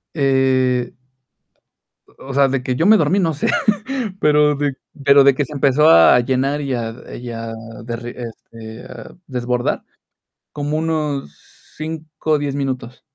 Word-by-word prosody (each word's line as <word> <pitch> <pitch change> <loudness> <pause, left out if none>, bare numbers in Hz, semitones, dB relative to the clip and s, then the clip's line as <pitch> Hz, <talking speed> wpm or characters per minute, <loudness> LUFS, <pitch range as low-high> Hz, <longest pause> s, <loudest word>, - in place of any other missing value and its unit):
Eh 130 -3 +1 1.1
o - - -16
o - - -4
sea, 140 0 +4
de 135 -1 -1
que 125 0 -1
yo 160 - +1
me 215 +2 +7
dormí, 165 +3 +2
no 165 -4 +1
sé, 145 - -2 0.7
pero 150 -1 +4
de 145 -1 -1 0.3
pero 140 0 +6
de 140 0 +6
que 145 - 0
se 140 - -10
empezó 145 +2 +3
a 85 - +7
llenar 135 +4 0
y 140 -2 -2
a 115 0 -5
y 120 0 -7
a 115 0 -6 0.3
derre 120 +1 -6
este, 115 0 -10 0.4
desbordar, 125 -2 -2 0.7
como 145 +1 -3
unos 150 - -2 0.4
5, 155 0 -5
o 150 - +5
10, 145 -1 -3
minutos. 130 -3 -4
135 Hz, 150 wpm, -19 LUFS, 125-150 Hz, 1.1 s, me